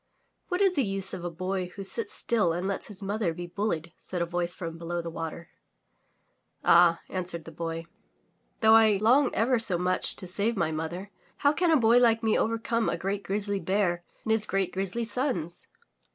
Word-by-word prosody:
''What 360 +1 -1
is 390 -2 +4
the 280 - +1
use 195 -2 -3
of 185 -2 -6
a 175 - -2
boy 185 +2 -3
who 195 - -6
sits 205 +2 -3
still 210 -8 +1
and 175 +3 -2
lets 200 - -3
his 205 -1 -9
mother 195 -4 -1
be 175 - -6
bullied?'' 170 -3 -3
said 180 - -5
a 170 - +1
voice 175 0 -2
from 165 -2 -6
below 170 +1 -3
the 170 -1 -5
water. 165 0 -6 1.2
*'Ah," 170 -1 +5
answered 175 -3 -3
the 165 - -9
Boy, 165 +1 -5 0.8
''though 220 0 +6
I 220 -2 +6
long 245 +7 +4
ever 240 +2 +2
so 195 -6 +4
much 180 +1 +3
to - - -5
save 200 +5 -1
my 160 - 0
mother, 170 +5 -5 0.3
how 285 - +6
can 345 +3 +1
a 320 - +5
boy 235 -1 +5
like 230 -2 +3
me 220 -1 +2
overcome 230 0 0
a 165 - -1
great 195 +3 -2
grizzly 200 0 -1
bear 185 -3 0 0.2
and 220 - -2
his 220 -1 +1
great 195 -1 -1
grizzly 195 +5 -2
sons?" 225 - -3
195 Hz, 195 wpm, -27 LUFS, 175-225 Hz, 1.2 s, though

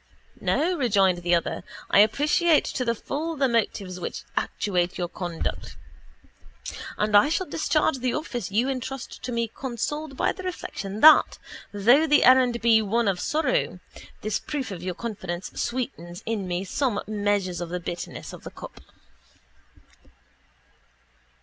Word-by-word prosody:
—No, 350 +3 +1
rejoined 195 -8 +3
the 175 0 +2
other, 170 - -2 0.3
I - - +6
appreciate 295 - +4
to 255 - -2
the 235 -1 0
full 320 +8 -4
the 275 -2 +2
motives 205 -6 -1
which - - -5
actuate 180 -3 -1
your 175 - -1
conduct 175 -1 -5 1.2
and 210 0 +1
I 205 +8 +6
shall 335 +4 0
discharge 310 -2 +1
the 250 -1 -1
office 245 - -4
you 225 +6 +1
entrust 265 -1 -5
to 250 - -5
me 235 -1 0
consoled 275 +3 -4
by - - +2
the 380 - -8
reflection 215 - -5
that, 310 0 +7 0.3
though 240 +10 +4
the 295 0 +5
errand 250 -2 +5
be 225 -1 +5
one 225 +2 0
of 190 -2 +1
sorrow, 260 - 0 0.4
this 215 0 -1
proof 275 -7 -4
of 180 -4 -6
your 180 -1 -4
confidence 190 -6 -5
sweetens 230 -9 -4
in 195 -5 -2
some 245 -1 -1
measure 205 -3 0
the 175 +1 -4
bitterness 175 0 -6
of - - -11
the - - -7
cup. - - -11
230 Hz, 145 wpm, -25 LUFS, 190-275 Hz, 1.2 s, that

